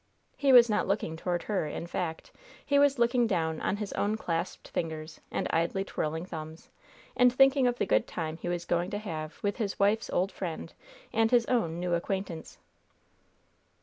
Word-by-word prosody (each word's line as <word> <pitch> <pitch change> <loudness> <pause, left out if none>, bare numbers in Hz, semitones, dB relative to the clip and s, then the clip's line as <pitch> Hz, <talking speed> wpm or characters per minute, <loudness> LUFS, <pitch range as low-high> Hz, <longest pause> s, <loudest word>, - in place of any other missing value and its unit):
He 280 -1 +2
was 245 -2 +9
not 210 -2 0
looking 195 -5 -1
toward 175 +1 -2
her, 190 -6 -1
in - - -5
fact, 170 -2 -4 0.3
he 285 0 +3
was 285 -1 +4
looking 240 0 +3
down 160 -6 -1
on 200 - 0
his 205 -1 -4
own 210 +2 0
clasped 170 -3 -3
fingers 160 -1 -4
and - - -2
idly 170 +4 +1
twirling 160 -2 -3
thumbs, 160 -2 -8 0.4
and 250 0 +5
thinking 270 +1 +5
of 245 0 0
the - - 0
good - - +2
time 160 -2 -4
he 175 - -5
was 175 -1 -2
going 175 +2 0
to 205 - -3
have 160 -7 -5
with 205 -1 0
his 210 -5 -2
wife's 205 +3 +2
old 190 +3 0
friend 170 -4 -5 0.4
and 225 0 +3
his 240 -1 +4
own 175 -10 0
new 175 0 -1
acquaintance. 175 -1 -3
190 Hz, 180 wpm, -29 LUFS, 165-225 Hz, 0.4 s, was